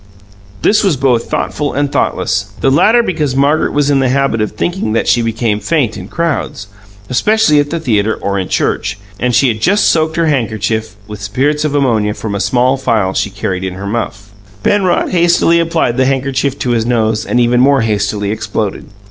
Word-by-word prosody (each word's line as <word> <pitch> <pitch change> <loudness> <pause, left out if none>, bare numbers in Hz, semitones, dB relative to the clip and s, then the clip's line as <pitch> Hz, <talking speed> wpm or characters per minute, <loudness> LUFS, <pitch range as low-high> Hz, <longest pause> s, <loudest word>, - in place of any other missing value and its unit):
This 210 +1 +3
was 185 -8 +1
both 125 -3 +1
thoughtful 145 -1 -2
and 145 0 -1
thoughtless 100 +1 -1
the 135 - +2
latter 215 - +4
because 150 - -1
Margaret 140 +3 +2
was 145 0 +1
in 140 - +3
the 130 -1 +1
habit 135 -4 +1
of 105 - -2
thinking 175 - -2
that 115 - 0
she 120 - +3
became 115 -2 -1
faint 130 0 0
in 95 -2 -8
crowds, 160 -9 -3 0.4
especially 160 - +2
at 145 0 0
the 165 - -2
theatre 110 -7 0
or 100 0 -2
in 95 - -3
church, - - -1 0.2
and 125 -1 0
she 130 +3 +4
had 110 -3 -2
just 200 - +3
soaked 160 -1 +1
her 165 - +1
handkerchief 110 -5 -1
with 105 -1 -9
spirits 135 +9 0
of 145 -1 -1
ammonia 110 -7 +1
from 110 -2 -5
a 100 - -2
small 125 +4 +1
phial 110 -7 0
she 100 - -1
carried 95 -2 -4
in 95 -1 -4
her 100 +1 -7
muff. 105 -1 -4 0.3
Penrod 190 -4 +1
hastily 170 -1 +3
applied 165 -7 0
the 130 - +3
handkerchief 135 0 -1
to 125 - -2
his 115 -2 +1
nose 110 -2 0
and 125 - 0
even 120 0 +3
more 135 0 +4
hastily 105 -1 -1
exploded. 105 -1 -3
125 Hz, 195 wpm, -14 LUFS, 110-145 Hz, 0.4 s, latter